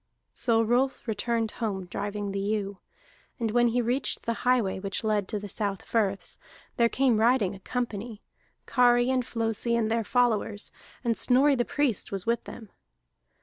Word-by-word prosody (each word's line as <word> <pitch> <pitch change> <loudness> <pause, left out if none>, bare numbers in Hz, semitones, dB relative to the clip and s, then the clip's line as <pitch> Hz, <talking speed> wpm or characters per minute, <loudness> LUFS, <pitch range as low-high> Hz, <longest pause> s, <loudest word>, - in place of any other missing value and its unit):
So 230 -3 +2
Rolf 245 +3 0
returned 225 +1 0
toward - - -10
home 190 -2 -5
driving 205 +2 -4
the 195 - -2
ewe; 200 -1 -2 0.6
and 225 -2 -1
when 240 +1 +4
he 240 +1 +1
reached 245 +4 -1
the 230 - +1
highway 245 -7 +2
which 195 +2 -4
led 210 -3 +1
to 215 - -3
the 205 0 -6
South 200 -1 -3
Firths, 200 -4 -1 0.4
there 235 -1 +3
came 250 -4 +2
riding 225 -4 +3
a 195 - -10
company, 225 -1 -4 0.4
Kari 245 0 +4
and 255 -1 +1
Flosi 230 0 -1
and 225 -1 0
their 230 0 +1
followers, 220 -3 +1 0.3
and 235 -2 +1
Snorri 270 +5 +4
the 245 -3 +1
Priest 280 -8 0
was 195 -1 -3
with 235 +1 0
them. 220 -4 -10
225 Hz, 170 wpm, -27 LUFS, 205-245 Hz, 0.6 s, when